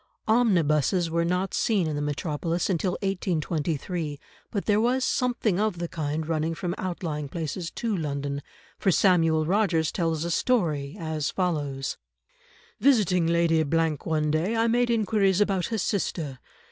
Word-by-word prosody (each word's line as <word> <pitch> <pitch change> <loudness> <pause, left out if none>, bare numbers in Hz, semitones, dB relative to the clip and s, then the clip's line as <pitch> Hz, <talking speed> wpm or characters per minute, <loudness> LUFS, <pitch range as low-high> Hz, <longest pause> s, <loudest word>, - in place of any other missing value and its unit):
Omnibuses 175 - +2
were 170 0 +1
not 180 +3 -1
seen 205 -6 +1
in 155 -1 -2
the 145 - -2
metropolis 160 +4 -1
until 180 +1 0
1823, 165 -4 -2 0.3
but 200 - -3
there 210 0 +3
was 250 +3 +2
something 240 -7 0
of 210 -4 0
the 170 0 -3
kind 155 -1 -3
running 160 0 -1
from 175 +1 -3
outlying 160 -5 -3
places 165 +2 -4
to 225 +2 -2
London, 140 -3 -3 0.4
for - - +2
Samuel 165 -4 +3
Rogers 175 -4 +2
tells 165 -2 -1
a 170 - -2
story 160 - 0
as 160 -2 -2
follows:— 145 -8 -2 0.8
"Visiting 195 -11 +3
Lady 170 -1 +3 0.2
—— 155 -3 -2
one 155 -2 0
day, 170 +9 0
I 225 0 +2
made 240 +1 +2
inquiries 210 -4 +2
about 195 -3 +1
her 225 - -2
sister. 165 - -2
170 Hz, 145 wpm, -26 LUFS, 155-195 Hz, 0.8 s, there